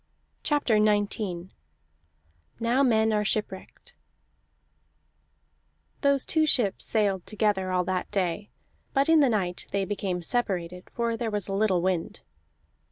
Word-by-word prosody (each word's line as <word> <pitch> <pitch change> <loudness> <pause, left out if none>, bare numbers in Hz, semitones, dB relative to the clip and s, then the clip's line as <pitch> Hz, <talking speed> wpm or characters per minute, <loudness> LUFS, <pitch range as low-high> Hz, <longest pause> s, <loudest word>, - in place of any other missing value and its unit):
CHAPTER 245 -8 +2
XIX 205 -4 -1 1.1
NOW 235 +4 +2
MEN 220 -4 +3
ARE 210 0 +1
SHIPWRECKED 210 - -4 2.1
Those 280 -2 +3
two 315 -1 +2
ships 225 -9 +2
sailed 200 -4 0
together, 210 -3 0
all 180 -1 +1
that 185 0 -2
day; 195 0 -2 0.4
but 275 +2 +2
in 325 -1 +6
the 280 -3 +4
night 185 -5 -2
they 200 -1 -1
became 190 -3 -3
separated, 180 -4 -2
for 235 -1 -1
there 230 0 -2
was 210 -2 -2
a 195 - -3
little 195 -4 +1
wind. 180 -3 -2
210 Hz, 125 wpm, -27 LUFS, 185-235 Hz, 2.1 s, in